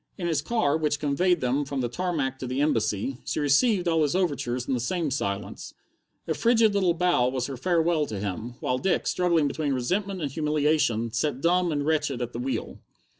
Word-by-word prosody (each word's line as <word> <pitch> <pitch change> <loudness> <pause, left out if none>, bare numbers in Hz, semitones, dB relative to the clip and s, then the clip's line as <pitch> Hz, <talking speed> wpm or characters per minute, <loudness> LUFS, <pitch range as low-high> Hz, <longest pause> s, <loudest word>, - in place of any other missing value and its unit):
In 175 - -4
his 160 -4 +1
car, 155 -6 +1
which 150 -2 0
conveyed 165 +4 +1
them 130 +3 +1
from 140 -1 -3
the 120 - 0
tarmac 140 -2 -2
to 130 - -5
the 130 +2 -2
Embassy, 125 -3 0
she - - -2
received 175 - +3
all 165 -1 +2
his 150 +2 +1
overtures 140 -9 -1
in - - 0
the 125 - 0
same 155 +5 -1
silence. 100 -7 -4 0.5
A - - +1
frigid 230 -2 +3
little 185 -4 +2
bow 175 -8 +2
was 130 -1 -2
her 135 - -5
farewell 165 +1 +1
to 105 - -5
him, 105 +5 -4
while 125 0 0
Dick, 190 +4 0
struggling 170 -4 +2
between 145 0 -1
resentment 185 +10 -1
and 145 -5 -3
humiliation, 150 -6 +1
sat 130 +3 -1
dumb 175 +3 +2
and 145 -1 -1
wretched 150 -4 0
at 120 -1 -4
the 120 - -4
wheel. 130 +2 -4
145 Hz, 200 wpm, -26 LUFS, 125-175 Hz, 0.5 s, received